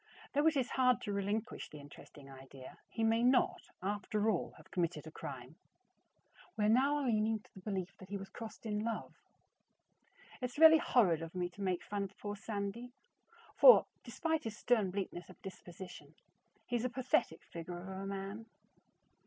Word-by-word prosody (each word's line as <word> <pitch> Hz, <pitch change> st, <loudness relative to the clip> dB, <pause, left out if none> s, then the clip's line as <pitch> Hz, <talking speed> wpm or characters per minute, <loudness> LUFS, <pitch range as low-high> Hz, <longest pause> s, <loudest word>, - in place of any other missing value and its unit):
Though 290 Hz, +3 st, +3 dB
it 315 Hz, -2 st, +3 dB
is 255 Hz, -2 st, 0 dB
hard 255 Hz, -1 st, +4 dB
to 205 Hz, -, -3 dB
relinquish 205 Hz, +3 st, -2 dB
the 150 Hz, -, -10 dB
interesting 145 Hz, 0 st, -13 dB
idea, 135 Hz, -1 st, -12 dB
he 225 Hz, -, -2 dB
may 225 Hz, +1 st, +3 dB
not, 250 Hz, +1 st, +3 dB
after 205 Hz, +2 st, 0 dB
all, 180 Hz, -, -2 dB
have -, -, -17 dB
committed 170 Hz, -4 st, -1 dB
a 160 Hz, -, -8 dB
crime. -, -, -8 dB, 1.0 s
We 210 Hz, -, +2 dB
are -, -, +4 dB
now 275 Hz, +5 st, +3 dB
leaning 220 Hz, -2 st, +2 dB
to -, -, -25 dB
the -, -, -11 dB
belief 195 Hz, -1 st, -4 dB
that 190 Hz, -, -12 dB
he 200 Hz, -, -3 dB
was 195 Hz, 0 st, -7 dB
crossed 225 Hz, +1 st, -9 dB
in 210 Hz, -1 st, -1 dB
love. 230 Hz, -1 st, -3 dB, 1.3 s
It's 250 Hz, +1 st, -4 dB
really 320 Hz, 0 st, +9 dB
horrid 185 Hz, -, +3 dB
of 165 Hz, +2 st, -7 dB
me 180 Hz, -1 st, -1 dB
to 200 Hz, -, -12 dB
make 185 Hz, -3 st, 0 dB
fun 205 Hz, -1 st, -3 dB
of 195 Hz, +1 st, -12 dB
poor 205 Hz, 0 st, -4 dB
Sandy, 210 Hz, +3 st, -4 dB, 0.6 s
for, -, -, +9 dB, 0.2 s
despite 320 Hz, -2 st, -1 dB
his 215 Hz, -2 st, -4 dB
stern 220 Hz, -6 st, +2 dB
bleakness 185 Hz, -2 st, -4 dB
of 185 Hz, -, -14 dB
disposition, 180 Hz, -5 st, -10 dB, 0.5 s
he's 240 Hz, -1 st, -1 dB
a 255 Hz, -, +1 dB
pathetic 250 Hz, -9 st, 0 dB
figure 170 Hz, +1 st, -7 dB
of 175 Hz, +2 st, -8 dB
a 190 Hz, +1 st, -5 dB
man. 195 Hz, +3 st, -5 dB
205 Hz, 175 wpm, -35 LUFS, 185-235 Hz, 1.3 s, really